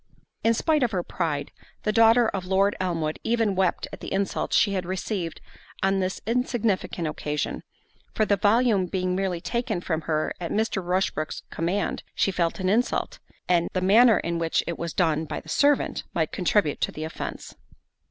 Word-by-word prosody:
In 230 0 +4
spite 310 +4 +2
of 245 - +3
her 180 -2 0
pride, 150 -6 -2 0.3
the 215 - +1
daughter 230 +1 +5
of 190 -2 -3
Lord 195 +2 +2
Elmwood 165 -4 -1
even 225 -3 +1
wept 190 -1 0
at - - -7
the - - -7
insult 195 0 -1
she 200 - +3
had 185 -2 -1
received 185 -1 -3 0.4
on 195 0 +2
this 185 0 -2
insignificant 230 -7 0
occasion; 150 -1 -3 0.5
for 215 - +3
the 205 - +3
volume 205 -1 +3
being 185 0 -1
merely 185 -2 -1
taken 235 0 -2
from 165 -2 -2
her 155 -1 0
at 170 - -3
Mr. 215 -3 0
Rushbrook's 180 -3 -1
command, 180 +5 -1
she 195 - +2
felt 170 -1 -1
an 185 - -1
insult; 225 +6 0 0.3
and 175 -1 +2
the 185 - 0
manner 220 +3 +6
in 170 0 -2
which 165 -1 +1
it 170 - -4
was 170 -1 -3
done 160 -3 +1
by - - -4
the - - -14
servant, 290 -1 +2
might 160 -2 0
contribute 180 -4 +1
to - - +1
the 155 - -6
offence. 160 - -6
190 Hz, 180 wpm, -25 LUFS, 170-215 Hz, 0.5 s, manner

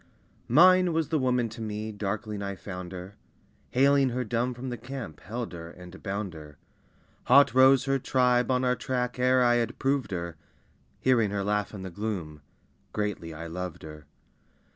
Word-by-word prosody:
Mine 180 +6 +6
was 160 -2 0
the 155 - +1
woman 125 -2 +1
to 115 +1 -9
me, 110 0 -4
darkling 105 +1 -4
I 100 -1 -4
found 90 -2 -7
her; 95 +2 -9 0.5
Haling 140 +1 +4
her 125 +1 -2
dumb 120 +2 -1
from 130 +2 -6
the 120 - -4
camp, 120 - -7
held 115 -1 -5
her 85 -1 -8
and 90 +2 -12
bound 100 -2 -3
her. 75 -3 -12 0.7
Hot 140 -1 +6
rose 130 0 +6
her 135 0 +1
tribe 125 -1 +2
on 130 0 +2
our 125 0 +2
track 125 -1 -2
ere 125 0 +4
I 120 0 +4
had 115 -1 -2
proved 135 -2 0
her; 85 -3 -4 0.6
Hearing 120 -5 +3
her 100 0 -2
laugh 105 0 -1
in 100 -3 -8
the 95 - -6
gloom, 85 -7 -4 0.5
greatly 105 -6 -3
I 80 +1 -7
loved 90 +1 -6
her. 75 -1 -11
110 Hz, 175 wpm, -28 LUFS, 95-125 Hz, 0.7 s, Mine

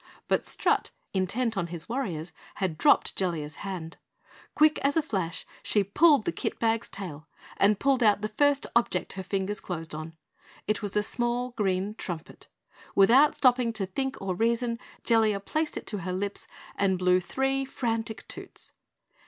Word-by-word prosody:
But - - +2
Strut, - - 0 0.2
intent 220 +5 0
on 175 -3 -1
his 170 -1 -6
Warriors, 185 - -3 0.2
had 185 -5 -1
dropped 290 - +4
Jellia's 160 -5 -2
hand. 180 -4 -6 0.6
Quick 305 0 +5
as 280 +3 +1
a - - +5
flash 185 - -2 0.2
she 205 - +2
pulled 280 - +4
the - - +1
kit 165 - -3
bag's 225 0 0
tail 165 -6 -8 0.3
and 205 0 +4
pulled 275 -2 +2
out 210 -2 +4
the 215 - -1
first 285 +6 +2
object 235 -6 +1
her 190 - -5
fingers 195 +2 -2
closed 165 -3 -5
on. 155 +1 -7 0.5
It 215 +1 0
was 205 -1 -2
a 210 - +3
small 240 +2 -1
green 200 -3 -1
trumpet. 175 -6 -7 0.5
Without 250 +10 +6
stopping 250 -2 +3
to 210 -3 -1
think 265 +8 -3
or 195 -1 -2
reason, 230 +3 0 0.2
Jellia 220 -3 +3
placed 310 +10 -2
it - - -6
to 205 - -3
her 180 +1 -3
lips 200 +2 -3 0.3
and 190 -2 +2
blew 180 0 +4
three 270 +8 0
frantic 230 -4 -3
toots. - - -8
210 Hz, 165 wpm, -28 LUFS, 185-245 Hz, 0.6 s, Without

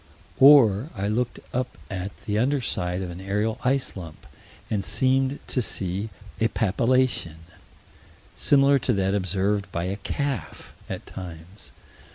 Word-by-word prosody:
Or 130 -3 +7
I 100 +1 -1
looked 120 +3 -1
up 125 0 -2
at 95 0 -3 0.2
the 105 0 0
under 140 +5 +2
side 90 -6 -2
of 90 - -5
an 85 +2 -8
aerial 105 +3 -1
ice 135 +1 0
lump, 85 -5 -9 0.4
and 105 -3 -1
seemed 130 +4 +1
to 130 - 0
see 100 -1 -3 0.3
a 110 - +3
papillation 115 - +1 1.0
similar 140 0 +4
to 125 - +1
that 95 -1 +1
observed 100 0 0
by 85 - -2
a 95 +3 -2
calf 115 - -4 0.2
at - - -5
times. 85 -2 -10
105 Hz, 140 wpm, -25 LUFS, 95-130 Hz, 1.0 s, Or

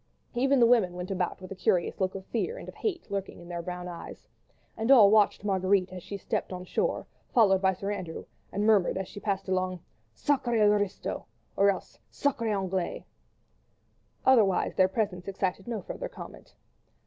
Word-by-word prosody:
Even 270 +2 +3
the 235 - +7
women 230 -7 +4
went 180 +2 -5
about 180 -2 -1
with 185 0 -10
a - - -4
curious 180 0 0
look 190 0 0
of 190 -1 -7
fear 450 - -2
and - - -9
of - - -8
hate 355 - -4
lurking 195 -3 -4
in 175 - -12
their 170 -1 -3
brown 180 0 -5
eyes; 175 -1 -9 0.5
and 225 +2 -2
all 225 -7 +8
watched 210 -2 +4
Marguerite 190 -1 +1
as 180 - -7
she 200 - -6
stepped 195 - -3
on 180 0 -6
shore, 480 - -1 0.3
followed 195 -5 +5
by 190 -1 +3
Sir 195 +3 -3
Andrew, 180 -5 -5 0.3
and 205 +2 -1
murmured 205 -5 +4
as 190 -1 -3
she 205 - -9
passed 195 -2 -2
along: 185 -1 -1 0.4
"Sacrés 240 -7 +2
aristos!" 205 -2 -1 0.3
or 200 0 +5
else 195 - -4
"Sacrés 240 -6 0
Anglais!" 190 -2 -2 1.2
Otherwise 220 -8 +4
their 185 - +4
presence 190 -2 -2
excited 195 0 -2
no 225 -5 -3
further - - -6
comment. - - -11
195 Hz, 180 wpm, -28 LUFS, 185-220 Hz, 1.2 s, all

